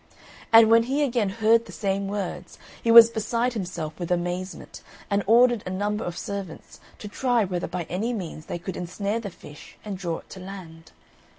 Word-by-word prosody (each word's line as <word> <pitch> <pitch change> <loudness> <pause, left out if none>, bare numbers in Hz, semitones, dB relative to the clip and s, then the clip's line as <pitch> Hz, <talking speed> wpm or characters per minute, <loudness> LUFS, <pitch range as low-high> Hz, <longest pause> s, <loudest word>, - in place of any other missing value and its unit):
And 225 -1 +7
when 230 0 +7
he 285 +2 +1
again 235 -7 0
heard 225 +3 +3
the - - -10
same 195 -1 -2
words, 190 -3 -5 0.2
he 230 - -2
was 230 0 +10
beside 230 +2 -1
himself 175 -7 -5
with 175 - -4
amazement, 180 +2 -4 0.3
and 200 0 +2
ordered 240 0 +5
a - - -6
number 205 +3 -2
of 175 0 -5
servants 195 -5 -7 0.2
to 210 - -8
try 240 +1 +1
whether 180 -2 -3
by 175 +1 -4
any 195 +9 -3
means 175 -8 -6
they - - -4
could 180 +2 -6
ensnare 200 +5 -3
the 215 -3 -6
fish 150 -4 -14
and 200 -3 -5
draw 170 -3 -3
it - - -15
to 190 - -9
land. 175 -4 -10
200 Hz, 190 wpm, -25 LUFS, 180-225 Hz, 0.3 s, was